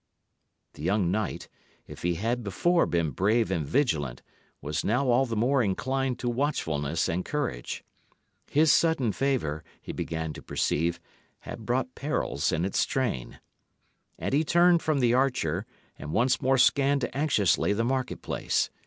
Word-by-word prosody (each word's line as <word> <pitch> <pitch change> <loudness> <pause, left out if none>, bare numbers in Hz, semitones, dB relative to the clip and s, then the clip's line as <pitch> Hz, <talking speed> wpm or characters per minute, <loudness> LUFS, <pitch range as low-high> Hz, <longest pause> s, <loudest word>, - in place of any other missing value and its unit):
The - - -12
young 90 +1 +1
knight, 105 0 -2 0.4
if - - -11
he 85 0 0
had 115 +6 -1
before 170 - +2
been 85 -3 0
brave 105 - +1
and 85 -4 0
vigilant, 75 - 0 0.4
was 75 +1 -3
now 125 +5 +1
all 130 +2 +3
the 115 - -3
more 125 +5 +2
inclined 130 +5 -1
to 125 - -4
watchfulness 80 - -1
and 90 +2 -1
courage. 140 - -3 0.7
His 155 +1 +4
sudden 160 -9 +3
favour, 100 - -1 0.2
he - - -7
began 80 -1 -3
to - - -10
perceive, 85 +2 -1 0.4
had 110 - -9
brought 130 +1 0
perils 140 - -1
in 85 +1 0
its 95 - +1
train. 115 - -2 0.8
And - - -3
he 150 +3 +3
turned 170 +1 +4
from 150 -3 0
the 120 -1 +3
archer, 120 - 0 0.3
and 75 - -6
once 125 +3 +2
more 135 +1 +3
scanned 140 0 +3
anxiously 120 - +2
the 110 +3 0
market 130 0 -2
place. - - -1
115 Hz, 155 wpm, -27 LUFS, 85-135 Hz, 0.8 s, His